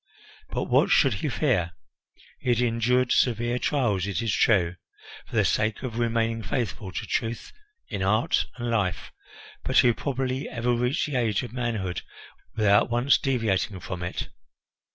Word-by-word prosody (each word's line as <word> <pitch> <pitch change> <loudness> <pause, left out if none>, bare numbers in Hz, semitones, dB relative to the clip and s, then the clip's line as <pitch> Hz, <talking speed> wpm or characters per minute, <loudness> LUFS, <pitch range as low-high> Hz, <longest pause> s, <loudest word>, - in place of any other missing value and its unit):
But - - -2
what - - +3
should - - +4
he - - -1
fear? 85 -1 0 0.7
He - - -3
had 120 -1 +3
endured 120 +1 +2
severe 120 0 +2
trials, 105 -11 0
it 100 - -2
is 115 -3 -1
true, 90 -5 +2 0.5
for - - -9
the - - +3
sake 110 +1 0
of 120 -2 -4
remaining 115 -1 0
faithful 105 -4 -3
to - - -4
truth 115 +1 -3 0.3
in 95 - -4
art 105 +4 +2
and 120 -1 -3
life; 100 -6 -1 0.5
but - - 0
who 120 -2 +6
probably 130 +2 -3
ever 120 0 0
reached 125 +5 0
the 150 -3 -4
age 110 -4 +1
of 120 -2 -8
manhood 110 -8 -2 0.5
without 105 -1 +4
once 120 +4 +3
deviating 110 -7 0
from 90 0 -6
it? 90 +1 -4
115 Hz, 155 wpm, -26 LUFS, 100-125 Hz, 0.7 s, who